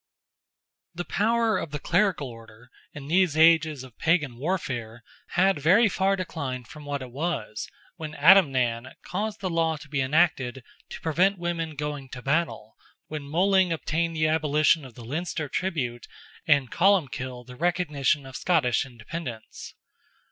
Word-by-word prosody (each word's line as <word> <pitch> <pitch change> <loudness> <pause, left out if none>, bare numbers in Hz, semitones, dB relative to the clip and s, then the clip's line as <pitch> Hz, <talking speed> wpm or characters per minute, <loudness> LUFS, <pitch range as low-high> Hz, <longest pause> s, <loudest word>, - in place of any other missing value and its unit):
The 175 +1 -4
power 225 +1 +1
of - - -5
the 145 - -4
clerical 175 -1 +1
order, 115 0 -14 0.2
in 145 -2 -9
these 170 -1 +2
ages 160 -3 +4
of 130 -4 -15
Pagan 150 -7 +1
warfare, 125 -8 -3 0.3
had 190 -3 +4
very 185 +10 +5
far 195 0 +1
declined 140 - -5
from 150 +3 -11
what 140 -2 -3
it 125 - -10
was, 140 -7 -3 0.3
when 155 -2 -7
Adamnan 130 -9 +4
caused 210 +3 -3
the 190 - -1
law 165 -1 +1
to 150 - -13
be 145 -2 -1
enacted 135 -3 +1 0.3
to - - -8
prevent 180 +5 +2
women 170 -2 -3
going 145 -2 -5
to 125 -1 -8
battle, 140 -7 -1 0.3
when 150 -2 -6
Moling 185 +3 +3
obtained 165 +1 -1
the 155 0 +2
abolition 155 -1 +2
of 125 - -13
the 120 - -10
Leinster 155 +3 -3
tribute, 135 -9 -3 0.4
and 140 -6 +3
Columbkill 135 -10 +1
the 125 0 -11
recognition 150 -4 0
of 135 0 -10
Scottish 135 -8 +1
independence. 120 -1 -8
155 Hz, 150 wpm, -26 LUFS, 130-175 Hz, 0.4 s, very